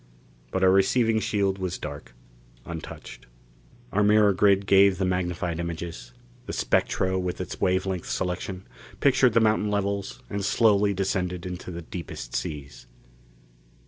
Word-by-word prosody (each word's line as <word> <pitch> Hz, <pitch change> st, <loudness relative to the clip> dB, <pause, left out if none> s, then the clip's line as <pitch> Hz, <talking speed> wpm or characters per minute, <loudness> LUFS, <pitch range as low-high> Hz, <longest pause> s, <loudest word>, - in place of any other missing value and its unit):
But 95 Hz, -, -1 dB
our 95 Hz, -, +6 dB
receiving 110 Hz, +4 st, +3 dB
shield 100 Hz, -3 st, 0 dB
was 90 Hz, -1 st, -3 dB
dark, 70 Hz, -5 st, -8 dB, 0.5 s
untouched. 85 Hz, -2 st, -9 dB, 0.6 s
Our 105 Hz, -, +1 dB
mirror 105 Hz, 0 st, +5 dB
grid 100 Hz, 0 st, +3 dB
gave 100 Hz, -1 st, +5 dB
the 95 Hz, -, 0 dB
magnified 90 Hz, -2 st, -1 dB
images; 85 Hz, -7 st, -5 dB, 0.4 s
the -, -, -4 dB
spectro, 95 Hz, 0 st, +1 dB
with 90 Hz, -1 st, -3 dB
its -, -, -6 dB
wave 95 Hz, +1 st, +2 dB
length 95 Hz, -3 st, -3 dB
selection, 90 Hz, +1 st, -3 dB, 0.3 s
pictured 130 Hz, -3 st, +4 dB
the 115 Hz, -, +5 dB
mountain 110 Hz, -1 st, +2 dB
levels 100 Hz, -1 st, -2 dB
and 100 Hz, -1 st, -4 dB
slowly 100 Hz, -1 st, +3 dB
descended 90 Hz, -2 st, -2 dB
into 90 Hz, 0 st, -6 dB
the 85 Hz, -1 st, -6 dB
deepest 80 Hz, -8 st, -7 dB
seas. 70 Hz, -4 st, -5 dB
95 Hz, 140 wpm, -26 LUFS, 90-100 Hz, 0.6 s, our